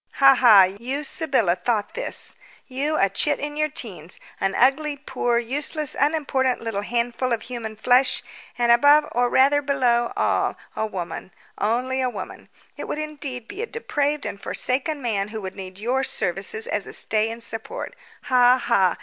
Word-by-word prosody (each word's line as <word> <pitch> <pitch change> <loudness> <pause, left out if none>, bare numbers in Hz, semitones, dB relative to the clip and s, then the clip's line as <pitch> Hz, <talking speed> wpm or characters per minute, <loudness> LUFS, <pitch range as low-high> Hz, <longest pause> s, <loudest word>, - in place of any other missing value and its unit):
"Ha 275 0 +6
ha! 230 -7 +7 0.2
You, 265 +5 -3
Sybylla, 270 - +1
thought 205 +3 -2
this! - - -2 0.3
You, 290 +4 -2
a 195 - +4
chit 290 +9 +1
in 295 +1 -4
your 305 0 0
teens, 185 - -4 0.2
an 195 - -1
ugly, 285 +3 +2
poor, 255 -4 -1
useless, 285 +5 -1
unimportant, 275 -4 0
little 225 -3 -3
handful 240 +3 -2
of 230 - -1
human 230 -3 -6
flesh, 250 +4 +3 0.3
and, 240 -1 +3
above, 290 +5 +5
or 245 +1 +1
rather 280 +3 +4
below, 250 -4 +1
all, - - 0 0.2
a 220 - -1
woman 185 -3 -6 0.3
only 250 +5 0
a 255 - +1
woman! 200 -6 -8 0.3
It - - -6
would - - -3
indeed 285 -6 -5
be 410 - -7
a 465 - -3
depraved 295 -11 -2
and 200 - -6
forsaken 280 +3 -1
man 205 -4 -1
who 220 +1 -6
would 190 -1 -6
need 185 -1 -9
your 250 +6 -1
services 195 - -1
as - - -2
a - - -7
stay 220 0 +1
and 230 +1 -5
support! 230 - -4 0.3
Ha 250 0 +5
ha! 200 -8 +2
250 Hz, 170 wpm, -23 LUFS, 220-285 Hz, 0.3 s, ha